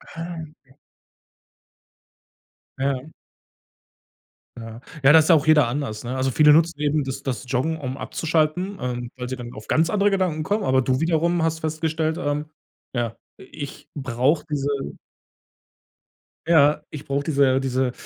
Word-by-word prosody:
Ah, 165 Hz, +1 st, -6 dB
okay. 150 Hz, -4 st, -15 dB, 2.1 s
Ja. 135 Hz, +2 st, -2 dB, 1.5 s
Ja. 115 Hz, 0 st, -9 dB, 0.2 s
Ja 135 Hz, -, +7 dB
da 160 Hz, -, +9 dB
ist 155 Hz, -, +1 dB
ja 165 Hz, -, +8 dB
auch 150 Hz, -, +1 dB
jeder 155 Hz, -5 st, +5 dB
anders, 120 Hz, -4 st, -4 dB
ne? 125 Hz, +2 st, -4 dB
Also, 130 Hz, 0 st, 0 dB
viele 150 Hz, +3 st, +6 dB
nutzen 165 Hz, -1 st, +3 dB
eben 150 Hz, 0 st, +1 dB
das 135 Hz, +1 st, -5 dB
das 130 Hz, -2 st, -3 dB
Joggen, 145 Hz, +6 st, 0 dB
um 130 Hz, -2 st, -5 dB
abzuschalten, 165 Hz, +7 st, -1 dB
ähm, 120 Hz, -1 st, -4 dB
weil 125 Hz, -1 st, -5 dB
sie 130 Hz, -, -3 dB
dann 120 Hz, -1 st, -8 dB
auf 110 Hz, -, -11 dB
ganz 160 Hz, +1 st, +2 dB
andere 205 Hz, -1 st, +2 dB
Gedanken 180 Hz, -5 st, 0 dB
kommen, 205 Hz, +5 st, -1 dB
aber 130 Hz, -5 st, +3 dB
du 130 Hz, +1 st, 0 dB
wiederum 170 Hz, +1 st, +1 dB
hast 160 Hz, 0 st, 0 dB
festgestellt, 160 Hz, 0 st, -1 dB
ähm: 145 Hz, +1 st, -2 dB, 0.5 s
„Ja, 120 Hz, -3 st, -2 dB, 0.2 s
i -, -, -12 dB, 0.2 s
ich 140 Hz, -, -9 dB
brauche 135 Hz, +2 st, 0 dB
diese“ 140 Hz, -1 st, -2 dB, 1.5 s
ja, 150 Hz, -2 st, +5 dB
ich 150 Hz, -1 st, -8 dB
brauche 140 Hz, +1 st, -1 dB
diese 140 Hz, -3 st, +3 dB
diese, 130 Hz, -1 st, 0 dB
145 Hz, 155 wpm, -23 LUFS, 130-160 Hz, 2.1 s, da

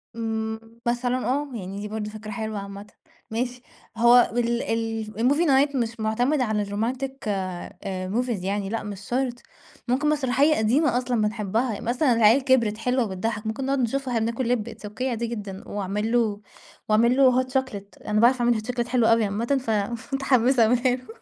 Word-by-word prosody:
إمم 220 Hz, -1 st, -3 dB, 0.3 s
مثلًا 245 Hz, +1 st, 0 dB
آه، 285 Hz, +3 st, 0 dB
يعني 195 Hz, -3 st, -6 dB
دي 210 Hz, -, -4 dB
برضو 210 Hz, 0 st, -4 dB
فكرة 215 Hz, 0 st, -8 dB
حلوة 220 Hz, 0 st, -4 dB
عامةً، 200 Hz, +1 st, -8 dB, 0.4 s
ماشي 245 Hz, +2 st, -2 dB, 0.4 s
هو 240 Hz, +1 st, +6 dB
ال 235 Hz, 0 st, +1 dB
ال 225 Hz, -1 st, -2 dB, 0.2 s
الmovie 315 Hz, +5 st, +2 dB
night 280 Hz, +1 st, +3 dB
مش 230 Hz, -2 st, -2 dB
معتمد 245 Hz, +7 st, +1 dB
على 215 Hz, -4 st, 0 dB
الromantic 240 Hz, +7 st, -2 dB, 0.2 s
آآ 185 Hz, -1 st, -4 dB
movies 240 Hz, -6 st, -1 dB
يعني، 195 Hz, +1 st, -2 dB
لأ 230 Hz, +2 st, -3 dB
مش 205 Hz, -2 st, -7 dB
شرط، 245 Hz, +3 st, -2 dB, 0.5 s
ممكن 265 Hz, +5 st, +1 dB
مسرحية 290 Hz, +1 st, +3 dB
قديمة 245 Hz, +4 st, +2 dB
أصلًا 245 Hz, -2 st, 0 dB
بنحبها، 215 Hz, +1 st, -1 dB
مثلًا 245 Hz, +3 st, +2 dB
العيال 230 Hz, +4 st, +5 dB
كبرت 235 Hz, -6 st, +2 dB
حلوة 250 Hz, +3 st, +1 dB
وبتضحَّك، 210 Hz, +2 st, -3 dB
ممكن 260 Hz, +5 st, -3 dB
نقعد 275 Hz, 0 st, 0 dB
نشوفها 265 Hz, +3 st, -1 dB
وإحنا 225 Hz, -1 st, +1 dB
بناكل 235 Hz, +1 st, -3 dB
لِب، 235 Hz, -2 st, 0 dB
It's 210 Hz, -2 st, -9 dB
Okay 220 Hz, +4 st, -6 dB
عادي 235 Hz, -2 st, -1 dB
جدًا، 205 Hz, -4 st, -6 dB
وأعمل 205 Hz, +2 st, -2 dB
له 220 Hz, -4 st, +1 dB, 0.5 s
وأعمل 230 Hz, +3 st, +4 dB
له 255 Hz, -2 st, +5 dB
hot -, -, -9 dB
chocolate، 255 Hz, -7 st, -4 dB
أنا 210 Hz, 0 st, +1 dB
باعرف 245 Hz, +1 st, +4 dB
أعمل 240 Hz, 0 st, +3 dB
hot -, -, -8 dB
chocolate 240 Hz, -1 st, -2 dB
حلو 240 Hz, -2 st, +2 dB
أوي 230 Hz, 0 st, +4 dB
عامةً، 205 Hz, +3 st, -2 dB, 0.6 s
فمتحمسة 265 Hz, -3 st, +3 dB
أعملها 245 Hz, +2 st, +3 dB
له. 260 Hz, -, -13 dB
230 Hz, 175 wpm, -25 LUFS, 215-255 Hz, 0.6 s, هو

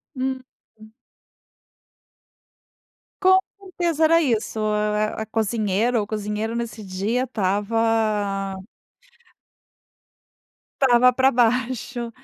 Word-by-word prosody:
Hum. 260 Hz, 0 st, -3 dB, 0.3 s
Uhum. 215 Hz, 0 st, -16 dB, 2.3 s
Com 375 Hz, 0 st, +6 dB, 0.2 s
certeza, 345 Hz, -4 st, -2 dB
era 330 Hz, +1 st, +4 dB
isso. 225 Hz, -5 st, -1 dB
Ah, 210 Hz, 0 st, -1 dB
a -, -, -3 dB
cozinheira 220 Hz, +1 st, 0 dB
ou 205 Hz, -, -3 dB
cozinheiro, 215 Hz, +1 st, -3 dB
nesse 235 Hz, -2 st, -5 dB
dia 200 Hz, +7 st, -2 dB
estava 210 Hz, -2 st, 0 dB, 2.3 s
estava 250 Hz, -1 st, +5 dB
para 260 Hz, +2 st, +3 dB
baixo. 240 Hz, 0 st, 0 dB
225 Hz, 85 wpm, -22 LUFS, 210-250 Hz, 2.3 s, Com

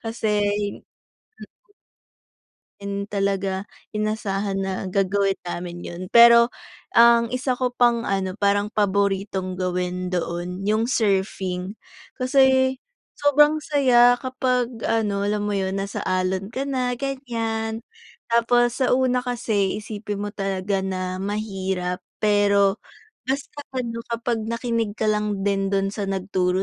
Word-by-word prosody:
kasi 220 Hz, -2 st, -1 dB, 0.4 s
mm. -, -, -44 dB, 1.9 s
And, 200 Hz, 0 st, -4 dB
talaga, 195 Hz, -1 st, -1 dB, 0.3 s
inasahan 205 Hz, -2 st, -1 dB
na 190 Hz, 0 st, -3 dB
gagawin 195 Hz, 0 st, +1 dB
namin 175 Hz, 0 st, -5 dB
yun 175 Hz, +1 st, -7 dB
pero 235 Hz, 0 st, +8 dB, 0.4 s
ang 235 Hz, 0 st, +5 dB
isa 255 Hz, 0 st, -1 dB
ko 250 Hz, -1 st, -1 dB
pang 240 Hz, -1 st, +2 dB
ano, 190 Hz, -1 st, -1 dB
parang 205 Hz, 0 st, +1 dB
paboritong 195 Hz, -2 st, 0 dB
gawin 180 Hz, 0 st, -2 dB
doon, 180 Hz, +2 st, -3 dB
yung 215 Hz, +2 st, +2 dB
surfing. 195 Hz, -3 st, -1 dB, 0.4 s
Kasi 260 Hz, 0 st, +3 dB, 0.4 s
sobrang 295 Hz, +2 st, +4 dB
saya 245 Hz, -4 st, +5 dB
kapag 255 Hz, -2 st, 0 dB, 0.2 s
ano, 205 Hz, -3 st, 0 dB
alam 205 Hz, 0 st, -1 dB
mo -, -, -1 dB
yun, 190 Hz, 0 st, -1 dB
nasa 195 Hz, 0 st, -3 dB
alon 185 Hz, +1 st, -1 dB
ka 265 Hz, +2 st, -2 dB
na, 255 Hz, -2 st, 0 dB
ganiyan. 230 Hz, -5 st, -3 dB, 0.5 s
Tapos 240 Hz, +2 st, +3 dB
sa 255 Hz, -, +3 dB
una 255 Hz, -1 st, +2 dB
kasi 220 Hz, -5 st, 0 dB
isipin 210 Hz, -1 st, -5 dB
mo -, -, -3 dB
talaga 195 Hz, 0 st, -2 dB
na 185 Hz, -1 st, -3 dB
mahirap 190 Hz, -3 st, -3 dB, 0.2 s
pero 200 Hz, -1 st, +3 dB, 0.5 s
basta 275 Hz, +2 st, -3 dB, 0.2 s
ano 230 Hz, -2 st, -3 dB
kapag 235 Hz, 0 st, -2 dB
nakinig 230 Hz, -2 st, -2 dB
ka 220 Hz, -, 0 dB
lang 210 Hz, -2 st, -1 dB
din 195 Hz, -1 st, 0 dB
dun 195 Hz, 0 st, 0 dB
sa 205 Hz, -1 st, -4 dB
nagturo 185 Hz, -1 st, 0 dB
205 Hz, 120 wpm, -23 LUFS, 195-235 Hz, 1.9 s, pero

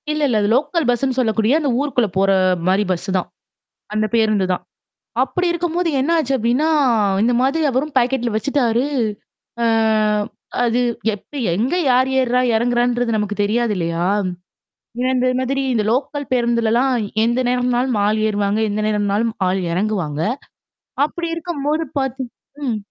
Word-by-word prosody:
இல்ல, 305 Hz, 0 st, -2 dB
இல்ல. 235 Hz, -5 st, +1 dB
அது 205 Hz, -, +1 dB
லோக்கல் 295 Hz, +2 st, 0 dB
பஸ்ன்னு 255 Hz, +1 st, 0 dB
சொல்லக்கூடிய 225 Hz, +3 st, +2 dB
அந்த 295 Hz, -3 st, -1 dB
ஊருக்குள்ள 270 Hz, -5 st, +1 dB
போற 195 Hz, +1 st, +3 dB, 0.4 s
மாரி 190 Hz, +3 st, +3 dB
பஸ் 185 Hz, +2 st, -3 dB
தான். 180 Hz, -, -2 dB, 0.7 s
அந்த 215 Hz, 0 st, +1 dB
பேருந்துதான். 210 Hz, -5 st, +1 dB, 0.6 s
அப்படி 360 Hz, -1 st, -1 dB
இருக்கும்போது 345 Hz, 0 st, -1 dB
என்ன 275 Hz, +5 st, 0 dB
ஆச்சு 275 Hz, -4 st, -1 dB
அப்டின்னா 250 Hz, +6 st, +1 dB, 0.5 s
இந்த 240 Hz, +2 st, +3 dB
மாதிரி 280 Hz, +5 st, +1 dB
அவரும் 270 Hz, +4 st, -2 dB
பாக்கெட்ல 245 Hz, -1 st, 0 dB
வச்சுட்டாரு. 245 Hz, 0 st, +1 dB, 0.8 s
அ -, -, +2 dB, 1.0 s
அது 240 Hz, +1 st, +1 dB, 0.3 s
எப்ப, 205 Hz, -, -15 dB, 0.2 s
எங்க 245 Hz, -, 0 dB
யார் 255 Hz, +1 st, +3 dB
ஏர்றா 250 Hz, 0 st, +1 dB, 0.2 s
எறங்குறான்றது 240 Hz, 0 st, +1 dB
நமக்கு 210 Hz, -1 st, -2 dB
தெரியாது 230 Hz, +2 st, 0 dB
இல்லையா? 170 Hz, -1 st, -1 dB, 1.0 s
இ -, -, 0 dB
இந்த 255 Hz, 0 st, +1 dB
மாதிரி 270 Hz, +1 st, -1 dB
இந்த 215 Hz, -2 st, +1 dB
லோக்கல் 285 Hz, +3 st, -2 dB
பேருந்துலலாம் 235 Hz, +1 st, +2 dB, 0.3 s
எந்த 235 Hz, +2 st, +1 dB
நேரம்னாலும் 250 Hz, 0 st, +1 dB
ஆள் 215 Hz, +1 st, +1 dB
ஏறுவாங்க, 205 Hz, 0 st, 0 dB
எந்த 210 Hz, +1 st, -2 dB
நேரம்னாலும் 210 Hz, +1 st, 0 dB, 0.2 s
ஆள் 190 Hz, +1 st, 0 dB
இறங்குவாங்க. 180 Hz, -6 st, -1 dB, 0.9 s
அப்படி 335 Hz, +3 st, -5 dB
இருக்கும்போது 315 Hz, -2 st, -2 dB, 0.2 s
பார்த் 265 Hz, 0 st, -2 dB, 0.4 s
ம். 235 Hz, -4 st, -1 dB
240 Hz, 135 wpm, -19 LUFS, 215-270 Hz, 1.0 s, போற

